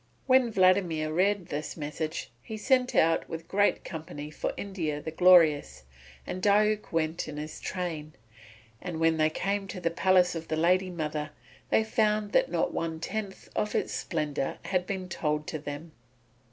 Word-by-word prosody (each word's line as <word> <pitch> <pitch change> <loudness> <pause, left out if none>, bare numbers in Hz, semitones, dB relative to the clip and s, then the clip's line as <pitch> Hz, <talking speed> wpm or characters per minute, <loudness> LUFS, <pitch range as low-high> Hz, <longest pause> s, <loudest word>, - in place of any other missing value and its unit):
When 260 -2 +5
Vladimir 185 -5 +3
had 155 - -4
read 195 +1 +2
this 150 +4 -4
message 155 0 -4
he 220 - -7
set 255 +3 +2
out 165 +1 +3
with 165 - -4
a - - -25
great 205 +4 +1
company 155 -3 -7
for - - -3
India 170 -7 -3
the 160 - -6
Glorious, 155 - +5 0.4
and 185 - -5
Diuk 210 +1 +3
went 165 0 -1
in 150 - -7
his 150 +1 -6
train; 160 -5 -4 0.7
and 175 -3 -5
when 165 0 +3
they 155 0 +3
came 195 +5 -2
to 190 - -6
the 170 -2 0
palace 180 +1 +3
of 165 -1 -6
the 155 - -1
lady 185 +3 +3
mother, 155 -3 -3 0.4
they 220 - +4
found 215 -2 +1
that - - +3
not 170 -1 0
one 165 -1 -2
tenth 200 +2 -5
of 210 - -1
its - - 0
splendour 150 -5 -2
had 185 -1 0
been 190 -2 -3
told 150 -3 -1
to 155 - -4
them. 145 +3 -7
170 Hz, 175 wpm, -28 LUFS, 155-195 Hz, 0.7 s, When